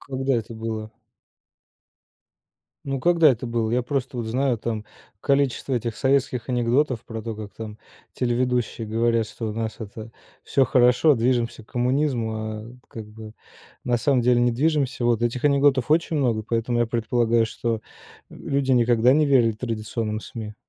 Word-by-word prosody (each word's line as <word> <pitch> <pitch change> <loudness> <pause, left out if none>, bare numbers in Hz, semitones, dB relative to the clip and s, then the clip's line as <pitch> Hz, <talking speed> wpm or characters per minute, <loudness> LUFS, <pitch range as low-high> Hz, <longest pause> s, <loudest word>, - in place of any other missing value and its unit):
Когда 135 -1 -2
это 115 -1 -3
было? 110 -1 -5 1.9
Ну, 135 -1 -2
когда 170 +1 +5
это 125 0 -2
было? 115 -1 -1
Я 125 +1 +1
просто 130 0 -3
вот 120 - -2
знаю 125 +2 0
там 110 -1 -4 0.3
количество 140 -1 +1
этих 115 -1 -2
советских 130 -3 0
анекдотов 125 +1 +1
про 115 -1 -6
то, 115 0 -5
как 105 -1 -8
там 105 +1 -8 0.4
телеведущие 125 -2 -1
говорят, 115 +1 +1
что 115 0 -5
у - - -5
нас 110 0 -4
это 110 +1 -8 0.3
всё 135 - +2
хорошо, 125 +4 +4
движемся 120 -1 0
к - - -22
коммунизму, 125 -2 0
а 110 +1 -6 0.2
как 110 -2 -8
бы 110 0 -11 0.5
на 120 -1 +1
самом 130 0 +2
деле 125 0 +3
не 120 0 +3
движемся. 135 -1 0
Вот 120 -1 +2
этих 120 +3 -1
анекдотов 140 -2 +3
очень 160 0 +2
много, 120 -6 +1
поэтому 115 +2 -1
я 120 - +2
предполагаю, 115 0 +1
что, 115 +1 -2
э, - - -11 0.5
люди 135 -1 -1
никогда 120 0 +4
не 150 +1 +3
верили 125 -5 +4
традиционным 110 -1 -3
СМИ. 105 -1 -8
120 Hz, 160 wpm, -24 LUFS, 110-130 Hz, 1.9 s, когда